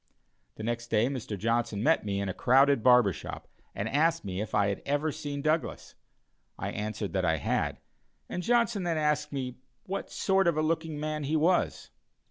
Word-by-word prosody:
The - - -8
next 120 +1 -2
day 115 +2 +2
Mr. 120 -6 -4
Johnson 115 0 0
met 160 +3 +3
me 100 -1 -2
in 100 - -2
a 95 - -2
crowded 135 +3 +4
barber 125 -4 +5
shop - - -8 0.3
and 100 - -2
asked 160 +3 +1
me 95 0 -3
if 110 - -4
I 100 -1 +3
had 100 - -3
ever 145 +2 0
seen 145 -2 -5
Douglas? 155 +1 -1 0.6
I - - -3
answered 105 -1 -4
that 95 -1 0
I 80 -2 +2
had, 70 - -1 0.5
and 180 - -4
Johnson 235 -1 +2
then 170 -2 -1
asked 150 -1 0 0.5
what 195 +1 -4
sort 190 -1 +2
of 170 -3 +2
a 155 - +2
looking 160 -1 -1
man 155 -1 -3
he 155 +3 0
was. 170 +4 +1
140 Hz, 185 wpm, -29 LUFS, 110-155 Hz, 0.6 s, barber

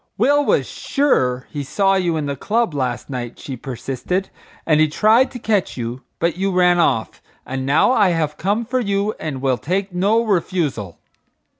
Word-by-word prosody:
"Will 285 +6 +3
was - - +2
sure 130 - 0
he 145 -2 -4
saw 195 +7 +1
you 175 -4 +1
in 150 - -2
the 140 -1 -2
club 225 - 0
last 130 -4 -2
night," 125 -3 -5
she 135 - -7
persisted, 135 +9 -4 0.3
"and 155 -2 +3
he 155 - +5
tried 220 - +3
to 250 - -8
catch 215 - -1
you, 120 +1 -4 0.2
but 170 0 0
you 195 +1 0
ran 180 -1 +3
off; 115 -9 0 0.2
and 130 0 -4
now 150 - +4
I 210 -7 +4
have 160 -3 -1
come 205 +6 -1
for 255 +3 -1
you 200 -2 0
and 140 -4 -5
will 130 -2 +1
take 190 +3 -2
no 205 +6 +2
refusal." 165 - -1
175 Hz, 180 wpm, -20 LUFS, 135-205 Hz, 0.3 s, he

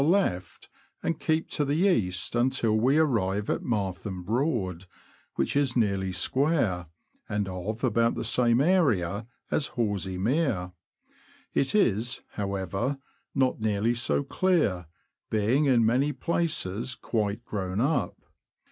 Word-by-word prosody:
ie - - +4
left, 160 - 0 0.4
and 165 -2 -1
keep 160 0 0
to 150 - -1
the 145 +1 0
east 90 - 0
until 120 -2 +2
we 130 +7 +3
arrive 105 -10 +1
at - - -1
Martham 95 -4 -3
Broad, 105 - -1 0.5
which 70 - 0
is 140 -3 +1
nearly 100 -4 +1
square, 105 - +1 0.4
and 105 -1 -1
of 95 +6 -5
about 115 -1 +2
the - - -3
same 120 0 +3
area 115 - +2 0.2
as 150 - +2
Horsey 100 -5 -1
Mere; 110 - 0 0.8
it 140 - +1
is, 120 - +2
however, 100 +6 -2 0.4
not 130 -3 +2
nearly 110 +2 +1
so 120 +4 0
clear, 140 - +1 0.4
being 110 +8 +2
in 120 -5 +4
many 130 +6 +2
places 130 - -2
quite 110 0 -2
grown 95 -1 -3
up. 135 -1 0
115 Hz, 130 wpm, -27 LUFS, 95-140 Hz, 0.8 s, ie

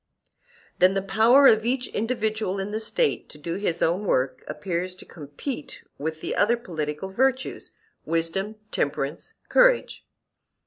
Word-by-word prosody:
Then 185 +2 +5
the 195 - 0
power 235 +7 +5
of 220 -4 +6
each 250 +2 0
individual 220 -3 -1
in 195 +2 -3
the 215 - -2
State 435 - 0
to - - -11
do 170 +4 -4
his 185 -4 -1
own 175 +5 +1
work 130 -3 0
appears 180 -1 -3
to - - -12
compete 150 - -7 0.2
with 160 +2 -4
the - - -3
other 235 +4 +3
political 155 -4 -4
virtues, 260 +5 -1 0.3
wisdom, 165 +6 -1 0.2
temperance, 140 0 -2
courage. - - +3
195 Hz, 140 wpm, -25 LUFS, 165-230 Hz, 0.3 s, of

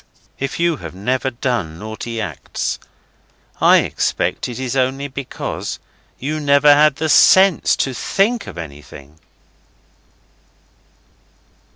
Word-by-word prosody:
If 135 +3 -4
you 170 -2 +1
have - - -9
never 125 +7 -1
done 115 -10 -3
naughty 110 +3 -6
acts 90 -9 -4 0.8
I - - +6
expect - - -2
it 120 - -6
is 130 -1 -3
only 135 +2 0
because 140 -1 -5 0.4
you 155 +4 -3
never 145 0 +5
had 150 -1 +4
the 160 +3 -2
sense 190 +3 +5
to 135 - -1
think 215 - 0
of - - -9
anything. 75 -1 -11
130 Hz, 110 wpm, -19 LUFS, 110-145 Hz, 0.8 s, I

